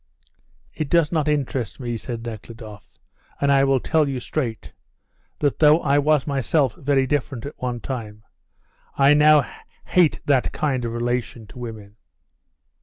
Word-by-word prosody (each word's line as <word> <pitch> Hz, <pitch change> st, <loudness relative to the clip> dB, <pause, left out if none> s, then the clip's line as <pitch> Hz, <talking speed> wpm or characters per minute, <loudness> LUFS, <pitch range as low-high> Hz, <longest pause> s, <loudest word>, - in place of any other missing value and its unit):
"It 155 Hz, -3 st, -4 dB
does 170 Hz, -2 st, +3 dB
not 155 Hz, -3 st, 0 dB
interest 135 Hz, -6 st, -2 dB
me," 120 Hz, -2 st, -3 dB
said 115 Hz, 0 st, -6 dB
Nekhludoff, 110 Hz, -2 st, -10 dB, 0.4 s
"and 140 Hz, 0 st, +2 dB
I 135 Hz, -1 st, +4 dB
will 135 Hz, -1 st, +3 dB
tell 155 Hz, +2 st, +1 dB
you 135 Hz, -2 st, -3 dB
straight, 120 Hz, -4 st, -4 dB, 0.6 s
that 145 Hz, -2 st, 0 dB
though 155 Hz, +1 st, +6 dB
I 140 Hz, 0 st, +2 dB
was 150 Hz, -1 st, +2 dB
myself 135 Hz, -2 st, +1 dB
very 135 Hz, -1 st, +1 dB
different 130 Hz, -3 st, -2 dB
at 145 Hz, -, -9 dB
one 125 Hz, -2 st, -3 dB
time, 110 Hz, -5 st, -6 dB, 0.7 s
I 140 Hz, +1 st, +5 dB
now 150 Hz, -2 st, +5 dB, 0.4 s
hate 175 Hz, -4 st, +3 dB
that 135 Hz, -3 st, +1 dB
kind 130 Hz, -5 st, -1 dB
of 115 Hz, -, -3 dB
relation 120 Hz, -1 st, -3 dB
to 125 Hz, +4 st, -13 dB
women." 110 Hz, -3 st, -9 dB
135 Hz, 150 wpm, -22 LUFS, 120-145 Hz, 0.7 s, though